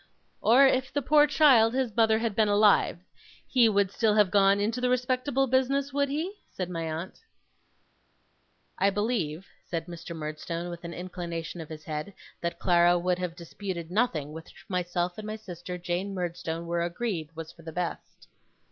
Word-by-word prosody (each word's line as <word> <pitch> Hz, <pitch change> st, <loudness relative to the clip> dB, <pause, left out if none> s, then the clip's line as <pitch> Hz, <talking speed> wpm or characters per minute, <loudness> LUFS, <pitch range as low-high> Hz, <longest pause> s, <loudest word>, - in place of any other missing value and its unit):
'Or 250 Hz, +5 st, +6 dB
if 260 Hz, -1 st, +2 dB
the 285 Hz, -, -1 dB
poor 295 Hz, +2 st, +5 dB
child, 260 Hz, -6 st, +5 dB
his 255 Hz, -5 st, -1 dB
mother, 220 Hz, -1 st, +4 dB
had 225 Hz, -2 st, -2 dB
been 220 Hz, -1 st, +3 dB
alive, 205 Hz, -2 st, +4 dB, 0.5 s
he 240 Hz, -4 st, +4 dB
would 200 Hz, -2 st, +2 dB
still 215 Hz, 0 st, +2 dB
have 205 Hz, -3 st, +4 dB
gone 200 Hz, 0 st, +4 dB
into 225 Hz, +4 st, -1 dB
the 250 Hz, -, +2 dB
respectable 255 Hz, +2 st, +1 dB
business, 270 Hz, +2 st, +1 dB
would 280 Hz, 0 st, +1 dB
he?' 320 Hz, +7 st, -2 dB, 0.2 s
said 180 Hz, -1 st, -5 dB
my 165 Hz, -2 st, -3 dB
aunt. 165 Hz, +4 st, -6 dB, 1.6 s
'I 200 Hz, -, +4 dB
believe,' 195 Hz, -6 st, -1 dB, 0.2 s
said 165 Hz, -2 st, -3 dB
Mr. 170 Hz, -1 st, -8 dB
Murdstone, 165 Hz, +3 st, -5 dB
with 170 Hz, 0 st, -8 dB
an 170 Hz, 0 st, -6 dB
inclination 170 Hz, -2 st, -5 dB
of 160 Hz, -, -9 dB
his 155 Hz, -1 st, -8 dB
head, 155 Hz, +5 st, -5 dB, 0.3 s
'that 170 Hz, 0 st, -2 dB
Clara 175 Hz, -1 st, +4 dB
would 180 Hz, +1 st, 0 dB
have 180 Hz, -2 st, -3 dB
disputed 170 Hz, 0 st, -6 dB
nothing 180 Hz, -, 0 dB
which 160 Hz, 0 st, -12 dB
myself 175 Hz, 0 st, -2 dB
and 215 Hz, -, -6 dB
my 215 Hz, -, -3 dB
sister 180 Hz, -4 st, -7 dB
Jane 180 Hz, +3 st, -3 dB
Murdstone 170 Hz, -2 st, -3 dB
were 170 Hz, 0 st, -1 dB
agreed 170 Hz, -3 st, -3 dB
was 160 Hz, 0 st, -7 dB
for 170 Hz, -, -17 dB
the 165 Hz, 0 st, -8 dB
best. 175 Hz, +1 st, -5 dB
185 Hz, 175 wpm, -28 LUFS, 170-230 Hz, 1.6 s, Or